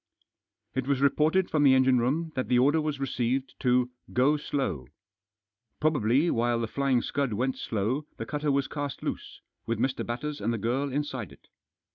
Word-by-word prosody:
It 130 0 -2
was 140 -2 +1
reported 155 +6 +2
from 155 - +2
the 135 -2 +6
engine 130 -1 +4
room 155 +7 0
that 130 - -2
the 125 - +3
order 145 +6 +4
was 150 -2 -2
received 130 0 -1
to 125 -1 +2 0.2
"Go 135 +5 +3
slow." 130 - -2 0.9
Probably 145 +1 +2
while 120 0 +1
The 115 - 0
Flying 135 0 +1
Scud 140 -5 -1
went 130 +5 0
slow 115 +8 -2
the - - -4
cutter 150 -1 -1
was 140 0 +1
cast 145 -3 -5
loose, - - -5 0.3
with 115 -1 0
Mr. 130 +3 -1
Batters 145 +4 -4
and 110 +3 0
the 115 - -1
girl 130 +6 -1
inside 130 - -3
it. - - -19
130 Hz, 175 wpm, -28 LUFS, 120-145 Hz, 0.9 s, the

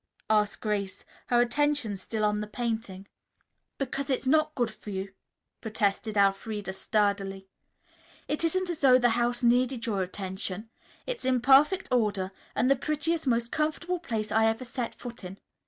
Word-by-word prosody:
asked 210 -1 +2
Grace, 205 -3 -2 0.2
her 240 - +3
attention 255 -3 +1
still 215 +3 -2
on 210 0 +1
the 210 - -4
painting. 220 -4 -4 0.7
"Because 275 +1 -3
it's 265 0 0
not 310 +3 +3
good 240 -4 0
for 210 - -11
you," 190 0 -4 0.5
protested 215 -1 -1
Elfreda 200 0 +1
sturdily. 195 -1 0 0.8
"It 300 - -2
isn't 360 +2 0
as 335 - -5
though 260 -2 +6
the 245 -1 +3
house 240 +1 0
needed 245 0 +2
your 205 -4 0
attention. 190 +3 -4 0.3
It's - - -4
in 255 -1 +2
perfect 280 +9 +5
order 205 -6 +1 0.2
and 235 - +2
the 275 - +5
prettiest, 305 +3 -1
most 235 -1 +1
comfortable 330 +4 -1
place 225 -9 -3
I 220 +1 +4
ever 225 +3 0
set 245 -1 -4
foot 240 -3 -9
in. 185 +1 -8
230 Hz, 155 wpm, -28 LUFS, 205-270 Hz, 0.8 s, though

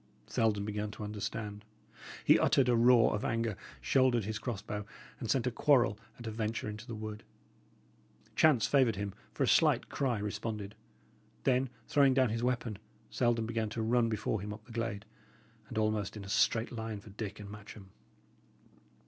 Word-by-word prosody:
Selden 105 -3 +1
began 105 0 -2
to 105 0 -8
understand; 105 0 -4 0.6
he - - +7
uttered 135 -3 +4
a 125 - +4
roar 120 0 +5
of 105 - -2
anger, 115 -2 0 0.3
shouldered 130 -5 +3
his 110 +1 -3
cross 115 -3 -3
bow, 105 -1 -4 0.4
and 115 - -5
sent 130 +3 +2
a 125 - +1
quarrel 120 -4 +3 0.2
at 120 - -10
a 110 - -3
venture 110 0 -2
into 105 +1 -7
the 115 - -5
wood. 110 0 -6 1.1
Chance 145 -8 +5
favoured 130 -6 +3
him, 100 -1 -4 0.2
for - - -1
a - - +2
slight - - +4
cry 130 -5 0
responded. 105 0 -4 0.7
Then, 130 0 +2 0.2
throwing 140 -2 +4
down 130 -3 +4
his 115 +2 -2
weapon, 120 -4 -1 0.3
Selden 120 -2 +1
began 110 -1 -1
to 115 +1 -3
run 115 +1 +3
before 110 -1 -1
him 105 +1 -5
up 110 +1 -9
the 120 - -14
glade, 115 -3 -3 0.6
and - - -6
almost 110 -1 0
in 105 - -7
a 100 - -9
straight 115 +3 +2
line 110 -3 -4
for 105 0 -13
Dick 105 0 -6
and 105 - -8
Matcham. 105 -2 -11
110 Hz, 175 wpm, -32 LUFS, 105-120 Hz, 1.1 s, he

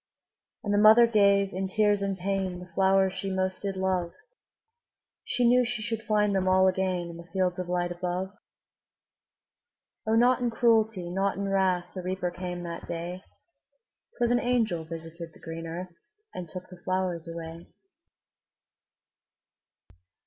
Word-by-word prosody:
'' - - -61
And 205 - -1
the 205 - +3
mother 220 +3 +8
gave, 200 -3 +3
in 190 +1 -2
tears 205 +1 +2
and 195 -1 -1
pain, 190 -1 -2
The 180 - -9
flowers 190 0 +3
she 195 +1 -4
most 190 0 -1
did 195 -1 -3
love; 185 -2 -1 1.1
She 245 -1 +1
knew 250 +1 +5
she 235 -2 -2
should 225 -1 -2
find 210 -2 +1
them 190 -1 +1
all 190 0 +5
again 185 -2 0
In 165 - -10
the 170 0 -11
fields 185 -1 0
of 180 -1 -4
light 175 0 0
above. 180 +2 -3 1.8
O, 220 - +3
not 245 +2 +4
in 245 - +1
cruelty, 220 -6 +2
not 195 +2 0
in 200 0 -2
wrath, 190 -2 +1
The 185 - -5
Reaper 185 0 -2
came 180 0 -5
that 170 -1 -6
day; 175 +2 -5 1.0
'Twas 240 -1 +2
an 245 - +3
angel 230 -10 0
visited 165 0 -8
the - - -16
green 165 0 -7
earth, 175 +2 -6 0.4
And 175 -3 -6
took 185 +3 -8
the 180 -1 -12
flowers 185 -3 -1
away. 165 0 -8
190 Hz, 155 wpm, -28 LUFS, 175-205 Hz, 1.8 s, mother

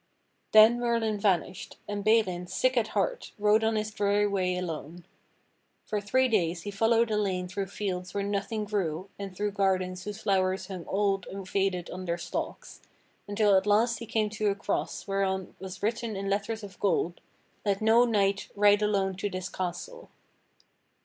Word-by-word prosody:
Then 220 +2 +7
Merlin 230 -3 0
vanished, 190 -2 -1
and 205 -1 -3
Balin, 195 -5 +2
sick 255 +7 +1
at 230 -3 +2
heart, - - -1
rode 210 +1 +3
on 220 0 +2
his 215 0 -1
dreary 205 0 +2
way 185 -3 0
alone. 170 -1 -5 0.8
For 210 -1 -2
three 260 +6 +2
days 175 -7 0
he 205 - -4
followed 225 +2 +2
a 210 - +1
lane 185 -3 -1
through 195 +2 -3
fields 185 -2 -4
where 200 +1 -2
nothing 205 +2 -2
grew 190 -3 -2
and 195 -2 -7
through 205 +1 -1
gardens 185 -2 0
whose 210 -1 -5
flowers 190 -1 +1
hung 185 -3 -6
old 195 -1 0
and 195 -1 -7
faded 190 -2 -1
on 185 +1 -6
their 170 -1 -1
stalks, 170 0 -5 0.5
until 205 -1 +3
at 190 +2 +2
last 225 +3 +3
he 230 - -7
came 215 -1 0
to 215 0 -1
a 200 - 0
cross 200 - -3
whereon 190 -1 -1
was 190 0 -8
written 225 0 -1
in 195 0 -3
letters 215 +2 -2
of 195 -2 -10
gold, 180 -3 0 0.4
"Let 200 -2 +1
no 225 +2 +5
knight 200 -4 +1
ride 205 0 +5
alone 200 -2 +1
to 205 +1 -2
this 185 -1 -4
castle." 185 - -5
200 Hz, 175 wpm, -28 LUFS, 185-215 Hz, 0.8 s, Then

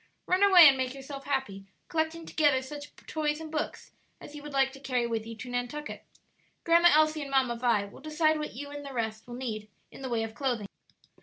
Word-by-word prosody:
Run 365 +1 +1
away 370 -5 +9
and 270 -1 +5
make 260 0 -2
yourself 275 0 -8
happy, 210 -9 -3 0.2
collecting 320 +1 -2
together 290 -5 +2
such 290 +2 -8 0.2
toys 300 -1 -1
and 320 -1 -8
books 305 -1 -4 0.3
as - - -11
you 295 - -8
would 295 0 -8
like 270 -1 +2
to 270 - -12
carry 255 -3 -1
with 225 -1 -3
you 230 - -7
to 225 +3 -9
Nantucket. 245 +5 -4 0.6
Grandma 340 +1 +6
Elsie 310 0 +3
and 280 - -5
Mamma 265 -3 +2
Vi 230 -4 +1
will 200 - -13
decide 310 +1 +1
what 300 - -5
you 285 +3 -7
and 290 0 -7
the 275 -1 -8
rest 220 -2 -3
will 240 - -7
need 220 -4 -5 0.2
in - - -12
the 260 - -4
way 230 -2 0
of 225 0 -5
clothing." 240 -4 -2
270 Hz, 220 wpm, -29 LUFS, 240-305 Hz, 0.6 s, away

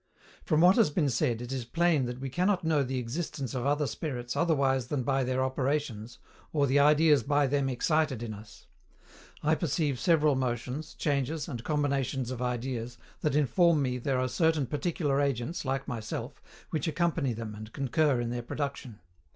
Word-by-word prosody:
From 155 0 +2
what 180 +5 +6
has 225 -8 +5
been 145 -2 +1
said, 120 -2 0
it 120 - -7
is 130 -2 -2
plain 160 +2 +2
that 125 +1 -5
we 135 - -4
cannot 180 +5 +1
know 160 -3 +2
the 130 -1 -2
existence 135 +2 -4
of 130 0 -2
other 145 +1 +2
spirits 125 -5 -4
otherwise 135 -6 +2
than 135 -1 -1
by 135 +1 +1
their 130 +1 0
operations, 130 -4 -2 0.3
or 145 -2 +2
the 140 +1 +3
ideas 150 +1 +5
by 145 0 +2
them 140 0 +1
excited 140 -1 0
in 110 -2 -4
us. 105 +1 -13 0.8
I 155 +1 +3
perceive 155 -4 0
several 155 -4 +3
motions, 130 +3 -3
changes, 145 0 -1
and 120 -7 -6
combinations 140 -4 -1
of 125 -1 -5
ideas, 120 -1 -3 0.2
that 150 -2 0
inform 150 +2 +3
me 125 -1 -1
there 130 +1 0
are 130 - +1
certain 155 +3 +1
particular 145 0 -1
agents, 140 +3 -2
like 135 +1 -2
myself, 115 -3 -5 0.3
which 155 0 -1
accompany 160 -5 0
them 110 -1 -6
and 110 +1 -9
concur 140 0 +1
in 120 0 -2
their 120 0 -3
production. 135 -3 -5
135 Hz, 175 wpm, -29 LUFS, 125-150 Hz, 0.8 s, what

